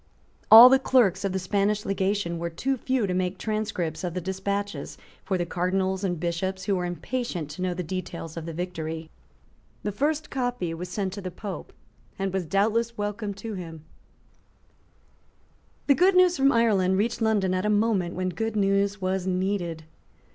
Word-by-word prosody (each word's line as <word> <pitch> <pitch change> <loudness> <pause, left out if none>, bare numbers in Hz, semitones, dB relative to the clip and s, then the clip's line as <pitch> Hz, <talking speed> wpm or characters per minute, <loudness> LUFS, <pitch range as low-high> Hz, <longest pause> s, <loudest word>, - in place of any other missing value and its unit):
All 225 +3 +12
the 265 +1 +5
clerks 215 -8 +3
of 195 - 0
the 190 - -1
Spanish 200 +2 0
legation 195 -3 -1
were 170 0 -2
too 265 +11 -1
few 255 -2 0
to 185 - -2
make 185 +1 -1
transcripts 210 -7 -3
of 175 -1 -3
the - - 0
despatches 190 -2 -3 0.3
for 190 -1 -1
the 175 - -1
Cardinals 185 +2 -1
and 175 -4 -1
Bishops 185 +3 -2
who 200 - +1
were 180 -1 -1
impatient 175 - -4
to 160 - -8
know 180 -1 -1
the 180 - -3
details 170 -2 -6
of 165 -1 -6
the - - -4
victory. 160 -2 -5 0.7
The 205 - -1
first 295 +7 -1
copy 245 -10 -2
was 175 +2 -6
sent 190 0 -2
to 200 - -6
the 185 - -4
Pope, 195 +2 -7 0.5
and 195 -1 -2
was 190 -4 -2
doubtless 225 +6 +1
welcome 205 0 -3
to 220 +2 -6
him, 165 -5 -8 2.0
The 285 - +5
good 365 +6 +4
news 365 -1 +5
from 275 0 +4
Ireland 200 -6 +3
reached 230 +3 -1
London 210 -4 +2
at 185 0 0
a 210 - +1
moment 210 -4 +1
when 185 0 -1
good 225 +5 -3
news 200 0 +1
was 185 0 -1
needed. 180 -3 -1
190 Hz, 175 wpm, -26 LUFS, 180-215 Hz, 2.0 s, All